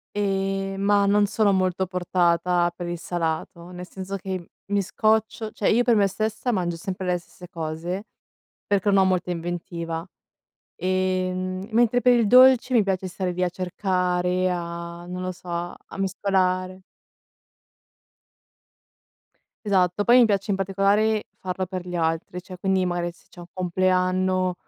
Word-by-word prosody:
Ehm, 195 Hz, -1 st, -1 dB
ma, 200 Hz, 0 st, +3 dB
non 205 Hz, +1 st, +4 dB
sono 205 Hz, 0 st, +2 dB
molto 185 Hz, 0 st, +1 dB
portata 175 Hz, -1 st, +1 dB
per 175 Hz, 0 st, -6 dB
il 175 Hz, 0 st, -4 dB
salato, 170 Hz, 0 st, -3 dB
nel 180 Hz, 0 st, -8 dB
senso 190 Hz, +1 st, -6 dB
che 185 Hz, -2 st, -6 dB, 0.2 s
mi 205 Hz, 0 st, +1 dB
scoccio, 220 Hz, +2 st, 0 dB
cioè 210 Hz, -, 0 dB
io 235 Hz, +3 st, +4 dB
per 240 Hz, -2 st, +3 dB
me 200 Hz, -1 st, +4 dB
stessa 215 Hz, +5 st, -2 dB
mangio 175 Hz, -6 st, -1 dB
sempre 185 Hz, +1 st, -5 dB
le 180 Hz, -1 st, +1 dB
stesse 180 Hz, +1 st, -14 dB
cose, 170 Hz, +4 st, -4 dB, 0.6 s
perché 200 Hz, 0 st, +2 dB
non 195 Hz, -, +4 dB
ho 190 Hz, -, +5 dB
molta 185 Hz, -1 st, 0 dB
inventiva. 170 Hz, -1 st, -4 dB, 0.7 s
Ehm, 185 Hz, 0 st, -1 dB
mentre 240 Hz, +2 st, +3 dB
per 250 Hz, 0 st, +5 dB
il 235 Hz, -3 st, +3 dB
dolce, 255 Hz, +2 st, +6 dB
mi 230 Hz, -4 st, +5 dB
piace 190 Hz, -1 st, -1 dB
stare 185 Hz, 0 st, -3 dB
lì 180 Hz, +1 st, -1 dB
a 180 Hz, -, +1 dB
cercare, 180 Hz, 0 st, 0 dB
a 170 Hz, 0 st, -5 dB
non 180 Hz, +1 st, -6 dB
lo 185 Hz, 0 st, -2 dB
so, 180 Hz, 0 st, -15 dB
a 175 Hz, +2 st, -6 dB
mescolare. 185 Hz, -1 st, 0 dB, 2.8 s
Esatto, 190 Hz, -1 st, +2 dB
poi 240 Hz, +3 st, +6 dB
mi 245 Hz, -, +7 dB
piace 205 Hz, -2 st, 0 dB
in -, -, +1 dB
particolare 200 Hz, +3 st, +1 dB
farlo 185 Hz, 0 st, -3 dB
per 185 Hz, 0 st, -5 dB
gli 180 Hz, 0 st, -4 dB
altri, 165 Hz, +2 st, -1 dB
cioè 185 Hz, 0 st, -10 dB
quindi 190 Hz, 0 st, +1 dB
magari 175 Hz, -1 st, -1 dB
se 170 Hz, -, -25 dB
c'è 175 Hz, -, -14 dB
un 175 Hz, -, -10 dB
compleanno, 185 Hz, 0 st, +1 dB
185 Hz, 155 wpm, -24 LUFS, 175-200 Hz, 2.8 s, mi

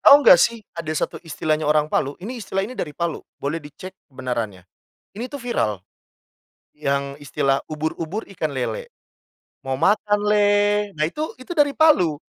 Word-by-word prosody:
Tahu 285 Hz, 0 st, +9 dB
enggak 175 Hz, -, +9 dB
sih 230 Hz, +1 st, +1 dB
ada 170 Hz, -2 st, -7 dB
satu -, -, -2 dB
istilahnya 155 Hz, -2 st, -1 dB
orang 150 Hz, 0 st, +3 dB
Palu, 140 Hz, 0 st, 0 dB
ini 240 Hz, +4 st, -5 dB
istilah 195 Hz, -1 st, -2 dB
ini 230 Hz, -, -6 dB
dari 150 Hz, -, -5 dB
Palu, 170 Hz, -2 st, -2 dB, 0.2 s
boleh 150 Hz, +4 st, -3 dB
dicek 150 Hz, +5 st, -10 dB, 0.2 s
kebenarannya. 120 Hz, -8 st, -4 dB, 0.5 s
Ini 240 Hz, +5 st, -5 dB
tuh 285 Hz, -, -5 dB
viral. 115 Hz, -, -1 dB, 1.0 s
Yang 140 Hz, -1 st, -2 dB
istilah 135 Hz, -1 st, 0 dB
"ubur-ubur 160 Hz, +6 st, -3 dB
ikan 155 Hz, -4 st, -1 dB
lele, 145 Hz, -, -3 dB, 0.8 s
mau 135 Hz, -, 0 dB
makan 205 Hz, +7 st, +2 dB
le." 205 Hz, 0 st, +3 dB
Nah 155 Hz, -, -3 dB
itu 305 Hz, -, -4 dB
itu 255 Hz, -, -18 dB
dari 295 Hz, -4 st, +3 dB
Palu. 240 Hz, -, +5 dB
165 Hz, 155 wpm, -22 LUFS, 145-210 Hz, 1.0 s, Tahu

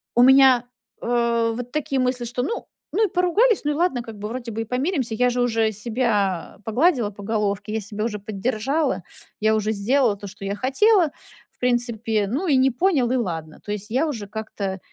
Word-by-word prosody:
у 240 Hz, -, +5 dB
меня, 260 Hz, -2 st, +6 dB, 0.4 s
э, 235 Hz, -1 st, +1 dB
вот 245 Hz, 0 st, -6 dB
такие 280 Hz, -2 st, -1 dB
мысли, 250 Hz, -1 st, 0 dB
что 245 Hz, +1 st, -3 dB
ну 460 Hz, -, -3 dB, 0.3 s
ну 440 Hz, -, +4 dB
и -, -, -12 dB
поругались, 375 Hz, +6 st, +3 dB
ну 295 Hz, -, +2 dB
и -, -, -1 dB
ладно, 300 Hz, -7 st, +1 dB
как 225 Hz, -3 st, -10 dB
бы, 210 Hz, -, -4 dB
вроде 235 Hz, 0 st, -5 dB
бы 225 Hz, +1 st, -3 dB
и -, -, -4 dB
помиримся. 255 Hz, -, -1 dB
Я 250 Hz, +2 st, +3 dB
же 245 Hz, 0 st, 0 dB
уже 225 Hz, -2 st, +2 dB
себя 210 Hz, -5 st, -1 dB
погладила 245 Hz, -, +2 dB
по 205 Hz, 0 st, -11 dB
головке, 210 Hz, -1 st, -1 dB
я 220 Hz, -, -1 dB
себя 210 Hz, +1 st, -4 dB
уже 210 Hz, -3 st, -3 dB
поддержала. 225 Hz, +7 st, -1 dB, 0.4 s
Я 220 Hz, +1 st, +3 dB
уже 215 Hz, 0 st, 0 dB
сделала 230 Hz, +2 st, +2 dB
то, 200 Hz, -, -8 dB
что 200 Hz, +1 st, -9 dB
я 200 Hz, +1 st, -2 dB
хотела, 330 Hz, -, +3 dB, 0.4 s
в -, -, -37 dB
принципе. 235 Hz, -4 st, 0 dB
Ну 270 Hz, -, -2 dB
и 290 Hz, -, +4 dB
не 260 Hz, +1 st, +4 dB
понял, 270 Hz, -2 st, +2 dB
и -, -, +2 dB
ладно. 165 Hz, -9 st, -4 dB
То 205 Hz, -, -4 dB
есть 210 Hz, +1 st, -5 dB
я 270 Hz, +7 st, +2 dB
уже 225 Hz, -9 st, -4 dB
как-то 200 Hz, -2 st, -5 dB
235 Hz, 205 wpm, -23 LUFS, 210-265 Hz, 0.4 s, меня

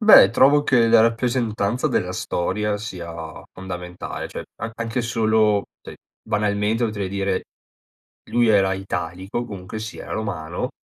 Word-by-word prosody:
Beh 215 Hz, -1 st, +9 dB
trovo 145 Hz, +2 st, +5 dB
che 125 Hz, -5 st, +4 dB
la 115 Hz, 0 st, +6 dB
rappresentanza 115 Hz, -1 st, +1 dB
della -, -, 0 dB
storia 105 Hz, +4 st, -1 dB
sia 90 Hz, -6 st, -6 dB, 0.4 s
fondamentale 90 Hz, -1 st, -6 dB
cioè, -, -, -7 dB, 0.2 s
a 110 Hz, -, -2 dB
anche 115 Hz, +1 st, -2 dB
solo 110 Hz, -3 st, +2 dB, 0.2 s
cioè -, -, -10 dB, 0.3 s
banalmente 105 Hz, +1 st, 0 dB
potrei 100 Hz, -4 st, -2 dB
dire 100 Hz, -1 st, -1 dB, 0.9 s
lui 120 Hz, -1 st, +3 dB
era 95 Hz, -3 st, +4 dB
italico 95 Hz, +3 st, -4 dB
comunque 100 Hz, -1 st, -7 dB
sia, 110 Hz, +1 st, -7 dB
Romano 90 Hz, -6 st, -3 dB
105 Hz, 125 wpm, -22 LUFS, 95-115 Hz, 0.9 s, Beh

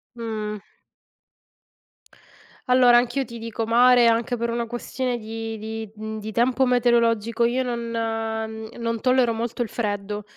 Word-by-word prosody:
Mh. 215 Hz, -3 st, -4 dB, 2.1 s
Allora, 250 Hz, -1 st, +6 dB
anch'io 250 Hz, +2 st, +2 dB
ti 235 Hz, 0 st, -9 dB
dico 225 Hz, 0 st, -4 dB
mare, 240 Hz, +1 st, +5 dB
anche 230 Hz, +1 st, +1 dB
per 235 Hz, +1 st, -2 dB
una 235 Hz, 0 st, -1 dB
questione 245 Hz, +1 st, -3 dB
di 225 Hz, 0 st, -6 dB
di 220 Hz, 0 st, -6 dB
mhmm, 220 Hz, 0 st, -6 dB
di 215 Hz, +1 st, -6 dB
tempo 250 Hz, +3 st, +2 dB
meteorologico. 235 Hz, -2 st, +2 dB
Io 245 Hz, +2 st, +2 dB
non 245 Hz, -2 st, -2 dB
mhmm, 225 Hz, 0 st, -4 dB
non 230 Hz, -1 st, -2 dB
tollero 255 Hz, -2 st, +3 dB
molto 235 Hz, +1 st, -3 dB
il -, -, -6 dB
freddo, 205 Hz, -2 st, -3 dB
230 Hz, 140 wpm, -23 LUFS, 220-240 Hz, 2.1 s, Allora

